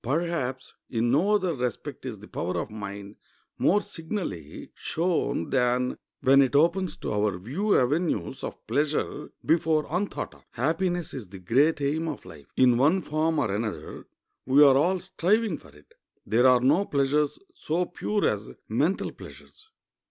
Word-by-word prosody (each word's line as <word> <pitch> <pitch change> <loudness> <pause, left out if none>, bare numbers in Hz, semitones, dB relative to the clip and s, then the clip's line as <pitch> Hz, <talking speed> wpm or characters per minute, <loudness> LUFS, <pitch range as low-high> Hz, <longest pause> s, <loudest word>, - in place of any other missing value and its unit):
Perhaps 135 -2 -2 0.2
in 120 0 0
no 185 +10 +3
other 185 -4 +1
respect 125 -5 -4
is - - -5
the - - -13
power 90 +1 -3
of 105 - -5
mind 100 -1 -7 0.4
more 205 - +4
signally 160 - -6
shown 165 - -1
than 125 0 +1 0.3
when 135 +1 +6
it 135 0 +1
opens 170 +5 +2
to - - -4
our 105 -2 +1
view 150 - 0
avenues 140 0 -1
of - - -7
pleasure 150 0 -1 0.2
before 160 -2 +2
unthought 185 +4 -2
of. - - -20
Happiness 165 +6 -1
is 115 -8 -7
the 95 - -9
great 140 - +2
aim 155 +4 0
of 150 -4 -5
life. 75 -3 -13
In 125 -2 +5
one 165 +7 +3
form 155 +1 0
or 125 -9 +1
another 110 +1 -4 0.4
we 135 +3 +7
are 135 -2 +7
all 175 +7 +3
striving 195 +5 0
for - - -17
it. 465 - -20 0.3
There 120 +4 +4
are 125 -1 +5
no 150 +10 +3
pleasures 145 0 +1 0.2
so 180 - -1
pure 205 +4 -1
as 105 0 -2 0.2
mental 150 - 0
pleasures. 430 +1 -14
145 Hz, 160 wpm, -26 LUFS, 125-170 Hz, 0.4 s, we